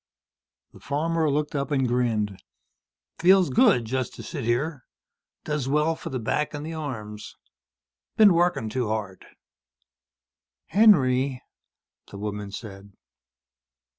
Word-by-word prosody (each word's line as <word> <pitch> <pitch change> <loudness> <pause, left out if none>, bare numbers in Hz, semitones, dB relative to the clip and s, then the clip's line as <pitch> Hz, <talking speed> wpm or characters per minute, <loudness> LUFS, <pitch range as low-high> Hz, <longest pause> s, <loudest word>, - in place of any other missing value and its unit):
The - - -15
farmer 160 +2 -1
looked 150 +1 -1
up 140 0 -2
and 135 -3 +1
grinned. 115 -5 -1 0.8
"Feels 185 +1 +5
good. 215 - +4
Just 130 +2 -3
to - - -9
sit 140 -8 -6
here. 135 +5 -1 0.6
Does 150 -3 -2
well 150 +3 +2
for 165 - -8
the 130 - -3
back 150 +6 -2
and 145 +1 -6
the 165 - -5
arms. 110 -9 -7 0.8
Been 210 -4 +7
working 170 -8 +1
too 120 +1 -2
hard." 105 -3 -4 1.5
"Henry," 135 - +4 0.6
the 100 - -10
woman 105 0 -5
said. 100 -1 -10
135 Hz, 120 wpm, -25 LUFS, 110-155 Hz, 1.5 s, Been